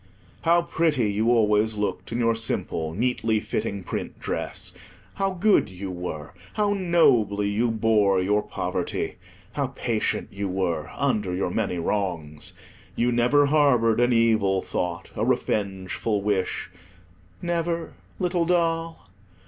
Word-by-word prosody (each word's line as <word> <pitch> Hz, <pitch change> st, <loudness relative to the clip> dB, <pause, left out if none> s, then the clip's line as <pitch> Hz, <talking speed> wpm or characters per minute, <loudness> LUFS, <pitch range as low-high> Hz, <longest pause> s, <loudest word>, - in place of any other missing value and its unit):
How 170 Hz, +1 st, +4 dB
pretty 150 Hz, -10 st, +1 dB
you 110 Hz, +3 st, +1 dB
always 110 Hz, -2 st, +3 dB
looked 105 Hz, +2 st, -3 dB
in 115 Hz, -, -1 dB
your 115 Hz, -1 st, +2 dB
simple, 80 Hz, -7 st, -2 dB
neatly 115 Hz, -1 st, +1 dB
fitting 100 Hz, -2 st, -3 dB
print -, -, -5 dB
dress. -, -, -4 dB, 0.4 s
How 195 Hz, 0 st, 0 dB
good 200 Hz, -, +3 dB
you 95 Hz, +1 st, -6 dB
were! 90 Hz, -2 st, -6 dB, 0.2 s
How 205 Hz, -1 st, +2 dB
nobly 120 Hz, -, +3 dB
you 115 Hz, +4 st, +1 dB
bore 110 Hz, -3 st, +3 dB
your 105 Hz, +3 st, +2 dB
poverty. -, -, -3 dB, 0.3 s
How 140 Hz, -2 st, -1 dB
patient 120 Hz, -4 st, -2 dB
you 100 Hz, 0 st, -3 dB
were 90 Hz, -4 st, -1 dB
under 95 Hz, -4 st, 0 dB
your 90 Hz, -1 st, -1 dB
many 100 Hz, -3 st, -1 dB
wrongs. 85 Hz, -5 st, -3 dB, 0.4 s
You 120 Hz, +1 st, +2 dB
never 125 Hz, +5 st, +4 dB
harboured 140 Hz, -7 st, +3 dB
an 120 Hz, +1 st, +3 dB
evil 110 Hz, -5 st, +3 dB
thought, 85 Hz, -1 st, -3 dB
a -, -, -1 dB
revengeful 100 Hz, +1 st, -1 dB
wish—never, 95 Hz, -, -4 dB, 0.2 s
little 180 Hz, -2 st, 0 dB
doll? 165 Hz, -, 0 dB
110 Hz, 125 wpm, -25 LUFS, 95-140 Hz, 0.4 s, How